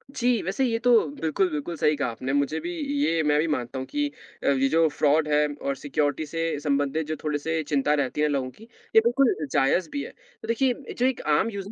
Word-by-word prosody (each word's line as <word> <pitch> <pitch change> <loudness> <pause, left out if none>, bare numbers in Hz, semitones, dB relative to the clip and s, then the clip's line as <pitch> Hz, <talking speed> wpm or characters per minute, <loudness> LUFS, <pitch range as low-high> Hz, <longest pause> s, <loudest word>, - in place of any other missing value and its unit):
जी, 245 -2 +2
वैसे 195 +9 -1
ये 230 -2 0
तो 245 +1 +2 0.3
बिल्कुल, 165 +4 +1
बिल्कुल 150 +3 -4
सही 150 0 +2
कहा 140 -3 -1
आपने, 130 +4 -4
मुझे 140 +2 0
भी 345 +2 -5 0.3
ये 165 - +1
मैं 150 0 +3
भी 160 - +1
मानता 130 -3 -2
हूँ 130 - -4
कि 295 0 -1 0.4
अब 140 - +3
ये 135 - +3
जो 165 +2 +4
फ्रॉड 150 +1 +2
है 150 0 +3
और 140 0 -1
सिक्योरिटी 145 +1 -1
से 165 0 -2
संबंधित 145 +1 0
जो 155 - -2
थोड़े-से 155 +2 -1
चिंता 145 -1 +1
रहती 145 0 -1
है 150 - +3
लोगों 135 -3 -1
की, 215 - -17 0.3
ये 220 - +9
बिल्कुल 245 +1 +3 0.2
जायज़ 160 +6 +2
भी 285 - -2
है। - - -8 0.3
तो - - -8
देखिए, 250 +3 +2 0.2
जो 245 - +2
एक 260 -1 0 0.2
आम 225 - +1
यूजर 200 -2 -6
155 Hz, 225 wpm, -25 LUFS, 145-200 Hz, 0.4 s, ये